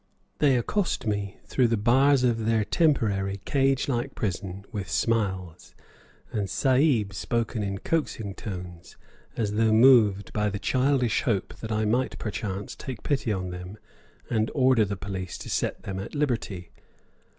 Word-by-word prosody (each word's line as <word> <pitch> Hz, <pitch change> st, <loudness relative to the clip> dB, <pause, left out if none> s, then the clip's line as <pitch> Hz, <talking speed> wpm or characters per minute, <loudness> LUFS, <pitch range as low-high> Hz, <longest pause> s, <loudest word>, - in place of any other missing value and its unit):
They 140 Hz, -4 st, +4 dB
accost 175 Hz, -, -1 dB
me 100 Hz, -2 st, -2 dB
through 125 Hz, -2 st, +2 dB
the 115 Hz, -1 st, +1 dB
bars 130 Hz, +5 st, +4 dB
of 115 Hz, -3 st, +1 dB
their 110 Hz, -2 st, +2 dB
temporary, 100 Hz, -, +1 dB
cage 135 Hz, -1 st, +2 dB
like 120 Hz, -3 st, -2 dB
prison 95 Hz, -1 st, -4 dB
with 100 Hz, -5 st, -5 dB
smiles, 95 Hz, -7 st, -1 dB, 0.6 s
and 100 Hz, -3 st, -2 dB
"Sahib" 130 Hz, -, +2 dB
spoken 115 Hz, +3 st, -2 dB
in 100 Hz, -1 st, -2 dB
coaxing 110 Hz, -7 st, -2 dB
tones, 90 Hz, -4 st, -8 dB, 0.4 s
as 105 Hz, -3 st, -1 dB
though 110 Hz, +1 st, +3 dB
moved 110 Hz, -4 st, +5 dB
by 105 Hz, -1 st, +1 dB
the 100 Hz, -, -3 dB
childish 130 Hz, 0 st, +1 dB
hope 105 Hz, -6 st, -1 dB
that 110 Hz, -, -6 dB
I 110 Hz, 0 st, +1 dB
might 125 Hz, +5 st, 0 dB
perchance 100 Hz, -2 st, -4 dB
take 130 Hz, -5 st, -7 dB
pity 135 Hz, -6 st, 0 dB
on 90 Hz, -3 st, -2 dB
them 90 Hz, +3 st, -8 dB, 0.5 s
and 110 Hz, -1 st, 0 dB
order 130 Hz, -5 st, +4 dB
the 100 Hz, -1 st, -4 dB
police 95 Hz, -2 st, -5 dB
to -, -, -7 dB
set -, -, -1 dB
them 95 Hz, -1 st, -4 dB
at 100 Hz, -, -7 dB
liberty. 115 Hz, -11 st, -2 dB
110 Hz, 150 wpm, -26 LUFS, 100-125 Hz, 0.6 s, moved